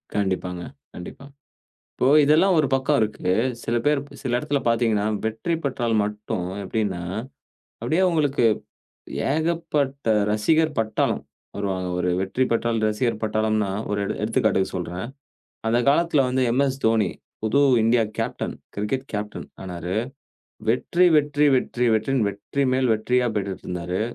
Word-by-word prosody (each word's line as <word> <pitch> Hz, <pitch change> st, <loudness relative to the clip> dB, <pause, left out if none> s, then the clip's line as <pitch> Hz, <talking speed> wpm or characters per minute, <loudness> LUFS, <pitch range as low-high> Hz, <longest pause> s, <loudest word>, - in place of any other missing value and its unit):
கண்டிப்பாங்க. 90 Hz, -3 st, -1 dB, 0.3 s
கண்டிப்பா. 90 Hz, +9 st, -9 dB, 0.7 s
இப்போ 125 Hz, -, +1 dB, 0.2 s
இதெல்லாம் 165 Hz, +6 st, +4 dB
ஒரு 145 Hz, -, +3 dB
பக்கம் 130 Hz, -1 st, +2 dB
இருக்கு. 105 Hz, -3 st, -1 dB, 0.3 s
சில 115 Hz, -, -1 dB
பேர் 145 Hz, -1 st, +3 dB
ப் -, -, -14 dB
சில 125 Hz, -, -3 dB
இடத்தில 145 Hz, +1 st, -1 dB
பார்த்தீங்கன்னா, 115 Hz, -3 st, +2 dB, 0.2 s
வெற்றி 110 Hz, +10 st, -2 dB
பெற்றால் 120 Hz, -4 st, -1 dB
மட்டும் 105 Hz, -3 st, -3 dB, 0.2 s
எப்பிடின்னா, 95 Hz, -3 st, -2 dB, 0.8 s
அப்பிடியே 155 Hz, +11 st, +1 dB
அங்களுக்கு 145 Hz, -6 st, +1 dB, 0.9 s
ஏகப்பட்ட 155 Hz, -5 st, -1 dB, 0.2 s
ரசிகர் 155 Hz, +9 st, +2 dB
பட்டாளம் 110 Hz, -1 st, 0 dB, 0.3 s
வருவாங்க. 95 Hz, -2 st, -2 dB
ஒரு 90 Hz, 0 st, 0 dB
வெற்றி 95 Hz, +7 st, 0 dB
பெற்றால் 115 Hz, 0 st, +1 dB
ரசிகர் 110 Hz, +1 st, -1 dB
பட்டாளம்ன்னா, 110 Hz, -2 st, 0 dB, 0.2 s
ஒரு 105 Hz, -, 0 dB
எடு -, -, -2 dB
எடுத்துக்காட்டுக்கு 110 Hz, -4 st, +1 dB
சொல்றேன். 90 Hz, +3 st, -4 dB, 0.6 s
அந்த 120 Hz, +2 st, +3 dB
காலத்தில 150 Hz, -1 st, +3 dB
வந்து 130 Hz, +1 st, 0 dB
எம் 130 Hz, +4 st, +3 dB
எஸ் 135 Hz, +1 st, -4 dB
தோனி, 110 Hz, -2 st, +3 dB, 0.3 s
புது 110 Hz, +6 st, +2 dB, 0.2 s
இந்தியா 115 Hz, +1 st, +4 dB
கேப்டன், -, -, -3 dB, 0.2 s
கிரிக்கெட் 115 Hz, +6 st, -2 dB
கேப்டன் 105 Hz, 0 st, -4 dB, 0.2 s
ஆனாரு. 90 Hz, -1 st, -4 dB, 0.7 s
வெற்றி 170 Hz, +9 st, +2 dB
வெற்றி 145 Hz, 0 st, +2 dB
வெற்றி 125 Hz, -1 st, -1 dB
வெற்றியின் 115 Hz, +2 st, +1 dB
வெற்றி 105 Hz, +8 st, -3 dB
மேல் 130 Hz, -2 st, +2 dB
வெற்றியா 125 Hz, +3 st, +1 dB
பெற்றிட்டு 100 Hz, -2 st, -3 dB
இருந்தாரு. 90 Hz, +1 st, -3 dB
115 Hz, 130 wpm, -23 LUFS, 105-140 Hz, 0.9 s, இதெல்லாம்